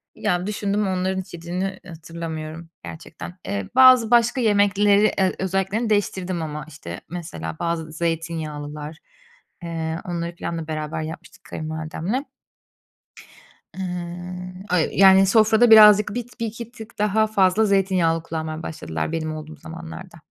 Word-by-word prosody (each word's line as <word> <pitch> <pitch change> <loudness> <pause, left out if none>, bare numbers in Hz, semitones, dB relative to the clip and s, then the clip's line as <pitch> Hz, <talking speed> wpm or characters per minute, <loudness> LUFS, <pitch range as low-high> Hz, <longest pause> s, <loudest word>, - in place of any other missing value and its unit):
Ya, 180 +2 -1
düşündüm 205 0 -1
onların 190 0 -1
hiç 185 - -15
yediğini 180 +3 -4
hatırlamıyorum 165 0 -7
gerçekten. 175 +2 -9
Eee, 100 -2 -3
bazı 255 -3 +7
başka 240 +2 +4
yemekleri, 205 -1 +4 0.2
eee, 190 -1 +2
özelliklerini 195 +4 -1
değiştirdim 185 -4 0
ama 150 -2 -5
işte 90 - -9
mesela 85 - -6
bazı 165 -2 -2
zeytinyağlılar, 155 -2 -4 0.7
eee, 165 -1 -3
onları 170 -1 -4
planla 165 -2 -5
beraber 155 0 -3
yapmıştık 160 +1 -9
kayınvalidemle. 160 - -4 1.5
Iıı, 180 0 -5 0.2
öy 165 -3 +3
yani, 195 0 +7
sofrada 220 +3 +4
birazcık 210 -1 +8
bit 245 0 -6
1-2 230 +1 -5
tık 220 -3 -12
daha 215 +1 +2
fazla 205 0 +3
zeytinyağlı 185 -5 +2
kullanmaya 160 0 -5
başladılar 80 - -4
benim 155 -1 -3
olduğum 155 0 -8
zamanlarda. 170 +2 -10
175 Hz, 120 wpm, -23 LUFS, 160-205 Hz, 1.5 s, birazcık